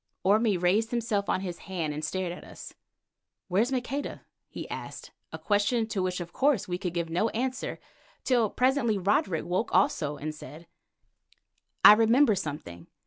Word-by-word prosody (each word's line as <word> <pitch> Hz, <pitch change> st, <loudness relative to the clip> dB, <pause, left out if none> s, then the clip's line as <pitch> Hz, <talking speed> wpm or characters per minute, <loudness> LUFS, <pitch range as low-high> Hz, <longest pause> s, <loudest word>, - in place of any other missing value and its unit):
Orme 210 Hz, +1 st, +3 dB
raised 190 Hz, +6 st, +2 dB
himself 225 Hz, -4 st, -1 dB
on -, -, +1 dB
his 180 Hz, -3 st, -5 dB
hand 165 Hz, -5 st, -2 dB
and 150 Hz, +1 st, -5 dB
stared 180 Hz, +3 st, -2 dB
at 175 Hz, -, -9 dB
us. -, -, -11 dB, 0.8 s
"Where's 215 Hz, +8 st, +2 dB
Maqueda?" 270 Hz, +2 st, -3 dB, 0.3 s
he -, -, -7 dB
asked, -, -, -8 dB, 0.2 s
a -, -, -6 dB
question 215 Hz, +3 st, +1 dB
to 200 Hz, -, -1 dB
which 185 Hz, 0 st, -2 dB
of 170 Hz, -1 st, -7 dB
course, 275 Hz, -6 st, +1 dB
we 180 Hz, 0 st, -3 dB
could 180 Hz, -2 st, -4 dB
give 170 Hz, -1 st, -2 dB
no 195 Hz, +7 st, +1 dB
answer, 260 Hz, +1 st, -3 dB, 0.5 s
till 240 Hz, -5 st, +2 dB
presently 250 Hz, -3 st, +1 dB
Roderick 190 Hz, -3 st, 0 dB
woke 185 Hz, +8 st, -1 dB
also 150 Hz, -, +1 dB
and 155 Hz, +1 st, -5 dB
said: 155 Hz, +2 st, -11 dB, 1.2 s
"I -, -, +12 dB
remember 230 Hz, +3 st, +4 dB
something. 145 Hz, -, -6 dB
195 Hz, 160 wpm, -28 LUFS, 175-230 Hz, 1.2 s, I